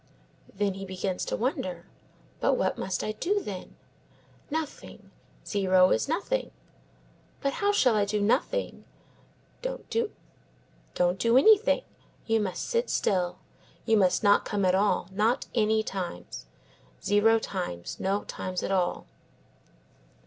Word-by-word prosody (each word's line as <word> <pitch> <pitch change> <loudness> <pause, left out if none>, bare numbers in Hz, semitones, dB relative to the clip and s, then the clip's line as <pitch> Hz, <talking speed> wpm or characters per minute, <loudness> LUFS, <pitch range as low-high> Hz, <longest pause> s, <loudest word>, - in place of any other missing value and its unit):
Then 200 0 -1
he 195 +1 -7
begins 185 -1 -3
to - - -2
wonder. 185 -8 -2 0.5
"But - - +2
what - - 0
must 185 -1 -3
I 215 - -1
do, 380 - 0
then?" 195 - -7 0.7
"Nothing; 315 -1 -6 0.3
zero 185 -2 +3
is - - +1
nothing." 395 - -1 0.9
"But 275 0 -1
how 405 0 +3
shall 255 - +3
I 205 -1 +3
do 210 +1 -1
nothing?" 270 - 0 0.8
"Don't - - -5
do 230 - -2
anything. 440 - +5 0.4
You 225 -1 +2
must 195 -4 -3
sit 475 0 0
still. 180 -2 0 0.5
You 225 - +3
must 190 -2 +3
not 205 -1 +5
come 205 -2 -1
at 185 - +3
all, 195 -2 +2
not 220 +6 +1
any 220 -1 +2
times. 175 - -6 0.6
Zero 210 +3 +4
times. 180 - -5
No 195 +2 0
times 185 -1 -4
at - - -2
all." 185 -2 0
205 Hz, 125 wpm, -28 LUFS, 185-275 Hz, 0.9 s, anything